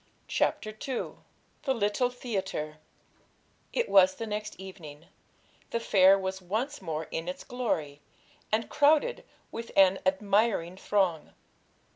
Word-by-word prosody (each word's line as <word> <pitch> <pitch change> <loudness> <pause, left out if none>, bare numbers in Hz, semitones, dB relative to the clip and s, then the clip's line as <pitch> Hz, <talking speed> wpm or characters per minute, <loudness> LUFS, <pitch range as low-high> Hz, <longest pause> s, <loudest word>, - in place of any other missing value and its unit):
CHAPTER 215 - 0
II 240 +4 -4 0.5
THE 265 -2 0
LITTLE 225 +3 +1
THEATRE 190 -11 -4 0.9
It 480 - 0
was 190 -1 +6
the 225 - -4
next 210 -2 -5
evening; 165 -5 -10 0.6
the 230 - -1
fair 195 -3 +6
was 190 0 -3
once 225 +10 -3
more 160 -3 -3
in 165 +1 -3
its 180 - -5
glory, 155 - -2 0.5
and 220 +1 +1
crowded 305 +12 +3 0.3
with 230 0 -6
an 195 0 +6
admiring 195 -1 +1
throng. 190 -6 0
195 Hz, 120 wpm, -29 LUFS, 185-230 Hz, 0.9 s, was